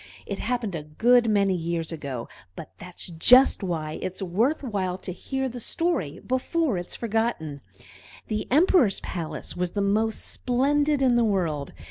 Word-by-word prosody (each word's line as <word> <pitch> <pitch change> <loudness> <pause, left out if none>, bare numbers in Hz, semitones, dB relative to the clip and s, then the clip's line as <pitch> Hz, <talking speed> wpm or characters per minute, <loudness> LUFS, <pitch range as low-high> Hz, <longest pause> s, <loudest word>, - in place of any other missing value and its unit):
It 200 - -5
happened 230 -3 -2
a 160 - -3
good 230 +11 +3
many 200 -2 +3
years 165 -1 -2
ago, 140 -7 -5 0.3
but 160 - -9
that's 180 0 -7
just 240 +13 +5
why 160 -5 -3
it's 185 0 -4
worth 220 - 0
while 190 -7 -2
to 185 - -6
hear 265 +8 -3
the 245 -1 -6
story 280 - -1
before 260 - 0
it 175 - -6
is - - -5
forgotten. 220 - -2 0.6
The 215 -1 -3
Emperor's 305 - +4
palace 160 -4 -5
was 180 -1 -2
the 205 - -1
most 215 +3 0
splendid 285 +3 +1
in 245 -2 +4
the 240 - +4
world. 170 -9 -1
200 Hz, 160 wpm, -25 LUFS, 170-250 Hz, 0.6 s, just